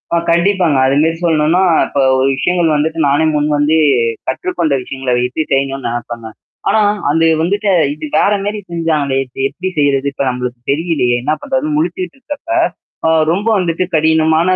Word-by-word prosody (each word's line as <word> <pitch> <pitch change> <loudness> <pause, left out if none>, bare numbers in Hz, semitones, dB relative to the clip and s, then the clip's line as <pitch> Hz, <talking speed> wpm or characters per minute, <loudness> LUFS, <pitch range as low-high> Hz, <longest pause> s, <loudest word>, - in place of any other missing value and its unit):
ஆ - - +3
கண்டிப்பாங்க. 175 -3 +2
அது 135 - +1
மாரி 165 0 0
சொல்ணும்னா, 160 +2 +2 0.2
இப்ப 140 - -3 0.2
ஒரு 130 - +2
விஷயங்கள் 170 +1 +1
வந்துட்டு 160 +2 -1
நானே 145 +3 +2
முன் 150 0 +1
வந்து 150 +2 +2 0.5
கற்றுக்கொண்ட 160 +2 -1
விஷயங்கள 130 0 -4
வைத்து 125 +5 -1
செய்யணும்னு 135 -1 0
நெனப்பேங்க. 115 -1 -5 0.4
ஆனா, 220 - +3 0.3
அந்த 165 +2 +2 0.2
வந்துட்டு 200 +4 0 0.2
இது 155 +1 -7
வேற 205 - +3
மேரி 205 +1 -3
செஞ்சாங்களே. 155 -5 0
இப்ப 125 - -25
எப்டி 180 +7 -5
செய்றது? 140 -1 +1
இப்ப 140 - -2
நம்மளுக்கு 125 -1 -4
தெரியலையே! 145 -6 0
என்ன 150 - +1
பண்றதுன்னு 290 +2 -1
முழிச்சுக்கிட்டு 340 -1 -3
இருக்கப்ப, 290 +4 -9 0.6
அ - - +4 0.2
ரொம்ப 200 +6 -1
வந்துட்டு 175 -1 -1
கடினமான 160 +3 +3
160 Hz, 155 wpm, -15 LUFS, 135-180 Hz, 0.6 s, அ